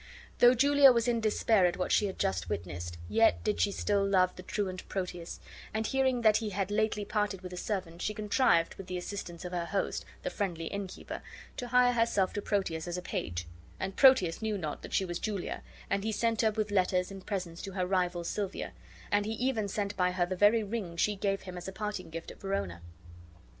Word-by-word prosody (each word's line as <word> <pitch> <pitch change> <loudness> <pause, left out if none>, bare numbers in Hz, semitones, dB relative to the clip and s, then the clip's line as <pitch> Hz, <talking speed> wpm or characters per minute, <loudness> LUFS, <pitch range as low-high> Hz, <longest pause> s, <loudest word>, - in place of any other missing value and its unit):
Though 245 +1 +7
Julia 280 +2 +7
was 235 -1 +1
in 235 -1 +1
despair 215 -2 +3
at 175 - -2
what 180 - -1
she 210 - +4
had 190 - -6
just 90 -2 -1
witnessed, 85 0 -4
yet 225 - +3
did 210 -1 0
she 200 - +3
still 200 0 +1
love 185 -2 +3
the - - -8
truant 185 -1 -4
Proteus; 180 -3 -4 0.4
and 220 0 0
hearing 260 0 +1
that 215 -2 +5
he 220 -1 -2
had 195 0 -2
lately 210 -1 +1
parted 205 -2 -1
with 180 -1 -8
a - - -6
servant, 180 -4 -3
she 210 - -1
contrived, 210 -4 +2
with 195 - -10
the 180 - -3
assistance 180 -2 -6
of 180 - -5
her 175 -1 -2
host, 200 +1 -1 0.2
the - - -2
friendly 175 -6 -2
innkeeper, 200 +1 -5 0.4
to 245 - -4
hire 250 0 +4
herself 230 -5 +2
to 205 - -2
Proteus 185 -6 -1
as 175 0 -3
a - - -3
page; 85 - -3 0.3
and 190 0 -3
Proteus 260 -12 +5
knew 215 -2 -1
not 155 -5 -5
she 190 - +2
was 175 -1 -4
Julia, 205 -4 -3 0.3
and 195 0 0
he 220 - 0
sent 225 0 +1
her 220 - +4
with 215 -1 -2
letters 185 -1 +2
and 195 -1 -9
presents 180 -4 -4
to 195 - -6
her 185 -1 0
rival, 180 -2 0
Silvia, 200 +2 -3 0.4
and 205 0 +2
he 220 - -1
even 225 -2 0
sent 200 0 -2
by 180 -1 +2
her 180 -1 +2
the 185 +1 -3
very 210 +4 +5
ring 200 -5 -4
she 210 +4 +2
gave 195 0 -1
him 180 -1 -7
as 175 - -8
a - - -4
parting 210 -2 -4
gift 165 +1 -7
at - - -15
Verona. 100 - -2
195 Hz, 215 wpm, -31 LUFS, 180-215 Hz, 0.4 s, Though